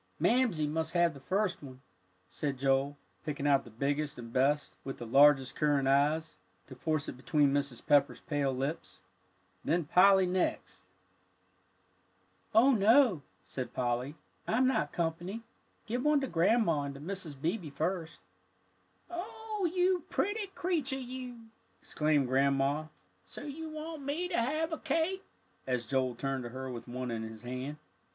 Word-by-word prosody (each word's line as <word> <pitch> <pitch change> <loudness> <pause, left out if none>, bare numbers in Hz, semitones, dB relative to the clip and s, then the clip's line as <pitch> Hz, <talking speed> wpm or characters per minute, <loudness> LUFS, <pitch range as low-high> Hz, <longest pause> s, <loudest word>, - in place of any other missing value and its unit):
"Mamsie 235 -11 +2
must 160 +2 -2
have 175 -1 +3
the 140 - -11
first 190 +7 -1
one," 130 -3 -10 0.5
said 140 +8 -3
Joel, 135 +2 +1 0.3
picking 145 -2 -4
out 140 -2 +4
the - - -11
biggest 140 +5 -2
and 115 -1 -9
best, 145 +3 +1
with 135 - -5
the 120 - -7
largest 135 +2 +5
currant 145 -3 +2
eyes, 150 +4 +2 0.3
to - - -11
force 155 -3 -2
it - - -5
between 145 +1 +2
Mrs. 140 -4 -2
Pepper's 145 -1 +3
pale 145 -3 0
lips, 130 - -4 0.6
"then 170 -1 +1
Polly 190 +4 +6
next." 180 0 -2 1.7
"Oh, 245 +5 +7
no, 230 - +5
Joe," - - -15 0.2
said 130 -2 -5
Polly, 125 +3 -1 0.3
"I'm 245 +4 +3
not 260 - +1
company. 175 +6 -3 0.4
Give 245 +3 -2
one 300 -1 +4
to 270 - -1
Grandma 170 - +2
and 140 -1 -5
to - - -9
Mrs. 165 -3 -6
Beebe 170 +2 -2
first." 160 +3 -3 0.9
"Oh, 400 +2 -4
you 360 -1 +1
pretty 410 +4 -1
creature 310 -7 -1
you!" 250 -3 -8 0.3
exclaimed 150 -2 +1
Grandma. 140 +3 +2 0.4
"So - - -9
you 310 +2 -6
want 310 0 -6
me 295 +6 -2
to 340 - +1
have 310 +6 -1
a 320 - -3
cake?" 375 +4 0 0.4
as 125 -2 -1
Joel 130 0 0
turned 135 +1 -2
to - - -5
her 130 +1 -6
with 120 0 -8
one 125 0 -4
in 115 -1 -3
his 110 0 -8
hand. 130 +4 -5
155 Hz, 155 wpm, -31 LUFS, -, 1.7 s, Oh